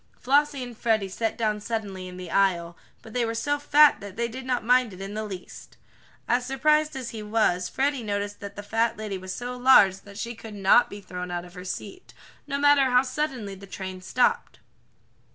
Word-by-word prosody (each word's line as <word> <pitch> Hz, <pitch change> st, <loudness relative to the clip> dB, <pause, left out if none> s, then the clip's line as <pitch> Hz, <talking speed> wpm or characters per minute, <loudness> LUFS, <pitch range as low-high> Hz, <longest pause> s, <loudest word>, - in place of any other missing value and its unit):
Flossie 285 Hz, 0 st, +2 dB
and 245 Hz, -1 st, -8 dB
Freddie 220 Hz, -3 st, +1 dB
sat 220 Hz, +4 st, -2 dB
down 215 Hz, -2 st, 0 dB
suddenly 205 Hz, -4 st, -4 dB
in 180 Hz, 0 st, -9 dB
the 180 Hz, -2 st, -8 dB
aisle, 175 Hz, -3 st, +1 dB, 0.3 s
but 220 Hz, -, -12 dB
they 245 Hz, -, +1 dB
were 230 Hz, 0 st, -2 dB
so 290 Hz, +5 st, 0 dB
fat 295 Hz, +1 st, +5 dB
that 200 Hz, -1 st, -9 dB
they 235 Hz, +1 st, -1 dB
did 255 Hz, +3 st, -8 dB
not 250 Hz, -4 st, -1 dB
mind 250 Hz, -1 st, +4 dB
it 185 Hz, -, -11 dB
in 195 Hz, +1 st, -6 dB
the 215 Hz, +1 st, -3 dB
least. 195 Hz, -4 st, -9 dB, 0.5 s
As 245 Hz, +1 st, +2 dB
surprised 300 Hz, +4 st, +2 dB
as 255 Hz, -3 st, -5 dB
he 220 Hz, -, -6 dB
was, 210 Hz, -4 st, +1 dB
Freddie 275 Hz, -1 st, 0 dB
noticed 205 Hz, -1 st, -3 dB
that 200 Hz, 0 st, -8 dB
the 205 Hz, -, -7 dB
fat 225 Hz, +2 st, 0 dB
lady 210 Hz, -3 st, -4 dB
was 185 Hz, 0 st, -7 dB
so 245 Hz, +5 st, -5 dB
large 245 Hz, -7 st, +6 dB
that 200 Hz, +1 st, -14 dB
she 235 Hz, +2 st, -4 dB
could 220 Hz, -2 st, -10 dB
not 200 Hz, +4 st, +4 dB
be 205 Hz, -, -9 dB
thrown 180 Hz, -1 st, -6 dB
out 175 Hz, 0 st, -4 dB
of 175 Hz, -, -14 dB
her 180 Hz, -1 st, -9 dB
seat, 370 Hz, -, -7 dB, 0.3 s
no 280 Hz, -1 st, -2 dB
matter 285 Hz, -1 st, +5 dB
how 250 Hz, 0 st, +4 dB
suddenly 255 Hz, -6 st, -3 dB
the 195 Hz, +1 st, -11 dB
train 185 Hz, -1 st, -7 dB
stopped. 245 Hz, +7 st, +1 dB
220 Hz, 210 wpm, -26 LUFS, 195-255 Hz, 0.5 s, large